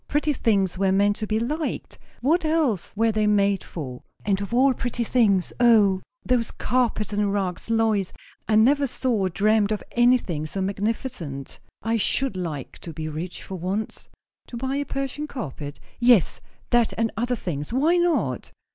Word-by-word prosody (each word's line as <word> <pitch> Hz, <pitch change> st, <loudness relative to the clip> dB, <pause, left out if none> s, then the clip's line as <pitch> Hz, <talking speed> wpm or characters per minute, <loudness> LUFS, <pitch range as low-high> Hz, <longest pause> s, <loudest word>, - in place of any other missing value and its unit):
Pretty 295 Hz, +1 st, +1 dB
things 195 Hz, -8 st, +1 dB
were 195 Hz, -1 st, +3 dB
meant 200 Hz, +1 st, +3 dB
to 215 Hz, -, -4 dB
be 215 Hz, +1 st, +1 dB
liked. 300 Hz, +7 st, -3 dB, 0.2 s
What 315 Hz, +8 st, +2 dB
else 310 Hz, -, +1 dB
were 225 Hz, +1 st, +3 dB
they 215 Hz, 0 st, +1 dB
made 200 Hz, -2 st, +2 dB
for? 130 Hz, -7 st, -7 dB, 0.2 s
And 200 Hz, -1 st, +1 dB
of 200 Hz, -, -5 dB
all 260 Hz, +3 st, +4 dB
pretty 240 Hz, 0 st, -2 dB
things 210 Hz, -6 st, +2 dB
O, 210 Hz, -6 st, +5 dB, 0.2 s
those 245 Hz, -2 st, +2 dB
carpets 235 Hz, -5 st, 0 dB
and 205 Hz, -1 st, +1 dB
rugs! 195 Hz, -1 st, -2 dB
Lois, 220 Hz, -4 st, +1 dB, 0.4 s
I 220 Hz, -, +2 dB
never 275 Hz, +6 st, +4 dB
saw 255 Hz, +1 st, -1 dB
or 195 Hz, -5 st, +1 dB
dreamed 210 Hz, +3 st, +2 dB
of 210 Hz, -, -2 dB
anything 240 Hz, -11 st, +2 dB
so 195 Hz, -, -4 dB
magnificent. 195 Hz, -, -3 dB, 0.2 s
I 225 Hz, +1 st, +1 dB
should 265 Hz, +2 st, +1 dB
like 160 Hz, -7 st, -5 dB
to 170 Hz, -, -8 dB
be 155 Hz, 0 st, -5 dB
rich, 165 Hz, +4 st, -6 dB
for 190 Hz, -, -6 dB
once!" 195 Hz, +5 st, -4 dB, 0.4 s
"To 240 Hz, -, -7 dB
buy 265 Hz, +3 st, -2 dB
a 285 Hz, -, -1 dB
Persian 275 Hz, +2 st, -3 dB
carpet?" 145 Hz, -, -6 dB, 0.2 s
"Yes. 240 Hz, -7 st, +4 dB, 0.3 s
That 240 Hz, -2 st, +3 dB
and 225 Hz, -1 st, +1 dB
other 245 Hz, +2 st, 0 dB
things. 150 Hz, -9 st, -4 dB
Why 305 Hz, +8 st, +3 dB
not?" 290 Hz, -, 0 dB
215 Hz, 170 wpm, -24 LUFS, 190-250 Hz, 0.4 s, O